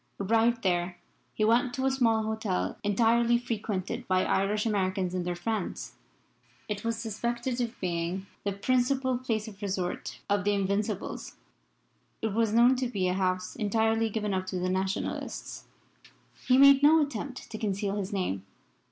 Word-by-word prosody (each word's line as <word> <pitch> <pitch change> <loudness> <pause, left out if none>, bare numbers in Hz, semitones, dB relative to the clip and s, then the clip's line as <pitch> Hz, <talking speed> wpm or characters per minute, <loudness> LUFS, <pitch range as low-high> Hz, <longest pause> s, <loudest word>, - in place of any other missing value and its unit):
Arrived 230 +3 +2
there, 175 -1 0 0.3
he 215 - 0
went 240 +2 +3
to 265 - -1
a 270 - +3
small 230 -4 +2
hotel 215 - -2
entirely 230 +3 +3
frequented 215 -6 -3
by 185 0 +2
Irish 205 +2 +1
Americans 190 -3 0
and 180 -1 -2
their 175 - -1
friends. 215 +2 -3 0.7
It 210 -1 -4
was 230 0 -1
suspected 235 +3 -2
of 235 0 -4
being 175 +1 -2 0.2
the 200 - 0
principal 255 +4 +1
place 225 -4 -2
of 210 -1 -11
resort 190 -3 -3
of 205 -2 +1
the 205 +1 +2
Invincibles. 200 +1 -2 0.8
It 220 -2 -2
was 225 0 +2
known 240 +3 +5
to 255 0 0
be 195 -6 -1
a - - +1
house 185 -1 -1
entirely 225 +1 +1
given 210 -1 -2
up 185 0 -2
to 185 - -3
the 180 0 -1
Nationalists. 190 +1 -3 0.8
He 255 - +5
made 275 0 +8
no 310 +3 +7
attempt 275 -1 -6
to 215 - -5
conceal 200 -1 -1
his 200 0 -3
name. 180 - -2
215 Hz, 160 wpm, -29 LUFS, 190-235 Hz, 0.8 s, made